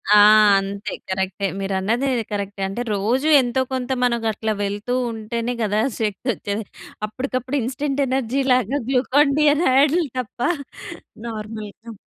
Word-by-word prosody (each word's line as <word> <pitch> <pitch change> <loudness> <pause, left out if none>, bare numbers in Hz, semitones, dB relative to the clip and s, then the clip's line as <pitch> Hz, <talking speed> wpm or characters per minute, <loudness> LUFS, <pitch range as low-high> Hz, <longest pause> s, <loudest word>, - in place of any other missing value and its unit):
ఆ! - - +8 0.4
అంతే 200 +1 -5 0.2
కరక్టే. 190 +1 -1
మీరన్నది 200 +7 0 0.2
కరక్టే. 200 -1 -4
అంటే 195 +5 -4
రోజు 235 +9 0
ఎంతో 250 +1 0
కొంత 255 0 -2
మనకట్లా 225 -2 0
వెళ్తూ 205 +5 -3 0.2
ఉంటేనే 230 +2 -3
గదా! 210 0 +1 0.2
శక్తొచ్చేది. 215 0 -2 0.4
అప్పటికప్పుడు 255 +3 -3
ఇన్‌స్టాంట్ 275 +3 -2
ఎనర్జీ‌లాగా 260 0 +1
గ్లూకాన్ 275 +2 +3
డి 300 - +4
అనే 305 +1 +1
యాడులు 305 +3 +3
తప్ప 240 -1 -7 0.9
నార్మల్‌గా. 215 0 -7
230 Hz, 115 wpm, -21 LUFS, 205-260 Hz, 0.9 s, ఆ